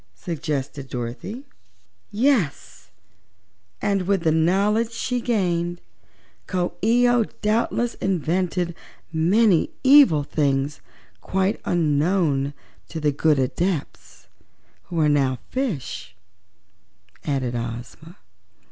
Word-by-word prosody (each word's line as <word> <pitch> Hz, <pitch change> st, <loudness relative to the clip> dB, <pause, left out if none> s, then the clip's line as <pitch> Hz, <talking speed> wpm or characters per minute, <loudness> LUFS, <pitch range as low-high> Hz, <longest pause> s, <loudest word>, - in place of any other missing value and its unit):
suggested 145 Hz, -4 st, -4 dB
Dorothy. 125 Hz, -, -5 dB, 0.6 s
"Yes, 220 Hz, -, 0 dB, 0.9 s
and 195 Hz, -3 st, 0 dB
with 195 Hz, -4 st, +1 dB
the 160 Hz, -, +3 dB
knowledge 200 Hz, +8 st, +2 dB
she 245 Hz, +1 st, -2 dB
gained 175 Hz, -7 st, 0 dB, 0.7 s
Coo 180 Hz, -2 st, -1 dB
ee 240 Hz, +3 st, +4 dB
oh 240 Hz, -2 st, +3 dB, 0.2 s
doubtless 230 Hz, +2 st, +1 dB
invented 180 Hz, 0 st, -1 dB, 0.4 s
many 180 Hz, +3 st, +3 dB
evil 265 Hz, -, +7 dB
things 140 Hz, -1 st, -1 dB, 0.4 s
quite 190 Hz, +2 st, 0 dB
unknown 150 Hz, -3 st, +1 dB, 0.3 s
to 165 Hz, -, -5 dB
the 150 Hz, -1 st, +2 dB
good 150 Hz, +1 st, +2 dB
Adepts, 155 Hz, +5 st, -3 dB, 0.6 s
who 170 Hz, -, -4 dB
are 155 Hz, -, +4 dB
now 135 Hz, -3 st, +2 dB
fishes," 155 Hz, -, -3 dB, 1.1 s
added 135 Hz, -4 st, -1 dB
Ozma. 120 Hz, +8 st, -6 dB
170 Hz, 95 wpm, -23 LUFS, 145-205 Hz, 1.1 s, evil